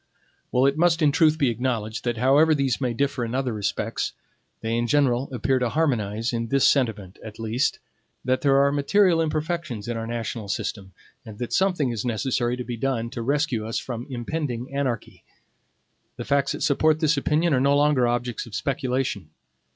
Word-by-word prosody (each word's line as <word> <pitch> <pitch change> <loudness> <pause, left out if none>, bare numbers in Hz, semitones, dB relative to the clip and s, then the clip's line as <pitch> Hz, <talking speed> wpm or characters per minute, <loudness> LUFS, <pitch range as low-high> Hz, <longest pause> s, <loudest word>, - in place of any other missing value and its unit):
It 135 +4 +2
must 170 -1 +3
in 145 - +5
truth 155 +1 +3
be 135 -5 +2
acknowledged 115 -2 -3
that, 120 -1 -1
however 145 +6 +4
these 135 -2 0
may 125 -2 0
differ 140 +1 -1
in 115 +1 -3
other 130 -3 -1
respects, 105 -2 -2 0.5
they 115 +1 -1
in 120 0 0
general 135 -1 +2
appear 130 +1 0
to 125 -2 0
harmonize 115 -7 0
in 115 0 -2
this 135 +3 +3
sentiment, 110 -8 0
at 110 -1 -9
least, 115 +4 0 0.5
that 130 0 +1
there 135 -1 +4
are 140 - +3
material 165 +4 +3
imperfections 155 - -3
in 120 -1 -2
our 115 0 -4
national 115 -2 -4
system, 100 -1 -4 0.3
and 110 -4 -10
that 120 0 -4
something 180 -9 +2
is 115 -2 -3
necessary 120 0 -1
to 125 - -4
be 120 -1 -5
done 115 -2 -2
to 120 - -5
rescue 140 -2 0
us 115 - -2
from 120 -1 -5
impending 125 0 -4
anarchy. 130 -5 -3 0.9
The - - -5
facts 140 -1 +1
that - - -4
support 155 +2 +3
this 155 0 +2
opinion 160 +2 +1
are 130 - +3
no 140 +1 +3
longer 145 -4 +3
objects 120 0 -2
of 110 - -8
speculation. 130 -1 -2
130 Hz, 180 wpm, -24 LUFS, 115-145 Hz, 0.9 s, in